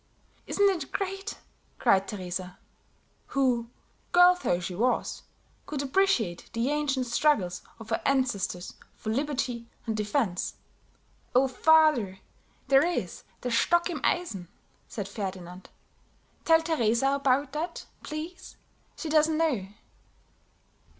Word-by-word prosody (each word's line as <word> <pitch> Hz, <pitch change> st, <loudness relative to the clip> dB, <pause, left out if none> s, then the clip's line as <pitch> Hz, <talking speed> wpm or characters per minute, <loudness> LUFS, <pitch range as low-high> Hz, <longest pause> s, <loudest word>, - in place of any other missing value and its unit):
"Isn't 405 Hz, 0 st, +3 dB
it 345 Hz, -8 st, -1 dB
great!" 390 Hz, +1 st, -3 dB, 0.4 s
cried 195 Hz, 0 st, +3 dB
Teresa, 185 Hz, -2 st, -5 dB, 0.7 s
who, 250 Hz, -4 st, +1 dB, 0.4 s
girl 355 Hz, 0 st, +7 dB
though 175 Hz, -, +1 dB
she 180 Hz, +1 st, -5 dB
was, 240 Hz, +7 st, 0 dB, 0.5 s
could 290 Hz, -2 st, -3 dB
appreciate 265 Hz, -, +1 dB
the 235 Hz, +4 st, 0 dB
ancient 285 Hz, -3 st, 0 dB
struggles 235 Hz, -8 st, +1 dB, 0.2 s
of 225 Hz, 0 st, -11 dB
her 225 Hz, -, 0 dB
ancestors 240 Hz, -9 st, 0 dB, 0.2 s
for 220 Hz, -, -4 dB
liberty 250 Hz, -3 st, -2 dB, 0.2 s
and 220 Hz, -2 st, -1 dB
defence. 210 Hz, -3 st, -1 dB, 0.8 s
"Oh, 265 Hz, +2 st, +5 dB
father, 260 Hz, -8 st, +4 dB, 0.5 s
there 270 Hz, +1 st, +6 dB
is 350 Hz, +1 st, -2 dB, 0.2 s
Der 250 Hz, -, -3 dB
Stock 345 Hz, +9 st, +3 dB
im 305 Hz, -5 st, -4 dB
Eisen!" 220 Hz, -, -1 dB, 0.4 s
said 205 Hz, -4 st, -5 dB
Ferdinand. 190 Hz, -3 st, -6 dB, 0.8 s
"Tell 325 Hz, -1 st, +5 dB
Teresa 270 Hz, -5 st, +2 dB
about 275 Hz, 0 st, +1 dB
that, 325 Hz, +4 st, -4 dB, 0.2 s
please; 320 Hz, +4 st, -7 dB, 0.4 s
she -, -, -6 dB
doesn't 310 Hz, 0 st, +3 dB
know." 280 Hz, -13 st, +1 dB
260 Hz, 115 wpm, -28 LUFS, 210-310 Hz, 0.8 s, girl